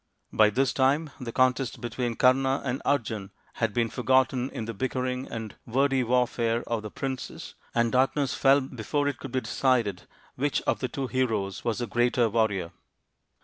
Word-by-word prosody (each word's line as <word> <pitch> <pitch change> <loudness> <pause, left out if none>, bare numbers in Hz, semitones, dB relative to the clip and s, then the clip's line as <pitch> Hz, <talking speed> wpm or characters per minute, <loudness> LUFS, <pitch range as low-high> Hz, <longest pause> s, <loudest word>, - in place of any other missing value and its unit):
By 110 -1 +5
this 130 +5 +1
time 140 +3 +2
the 120 -2 -5
contest 130 -1 +1
between 120 0 -3
Kama 135 +2 +3
and 130 0 -2
Arjun 110 -8 -1 0.3
had 115 -1 +2
been 115 +2 +1
forgotten 130 0 +2
in 115 - -5
the 115 - -4
bickering 130 +3 -2
and 110 -2 -6
wordy 135 +2 +2
warfare 120 -1 +1
of 115 -2 -2
the 105 - -6
princes, 130 +3 -5 0.2
and 115 -1 +2
darkness 135 +1 +2
fell 135 +1 +4
before 135 +3 -2
it 140 -3 -2
could 135 - -7
be 130 0 0
decided 115 -12 0 0.3
which 145 +2 -1
of - - 0
the 130 - -1
two 135 +1 -4
heroes 110 -7 -1
was 115 -3 -1
the 120 - -2
greater 120 0 +2
warrior. 100 -6 0
125 Hz, 170 wpm, -27 LUFS, 115-130 Hz, 0.3 s, By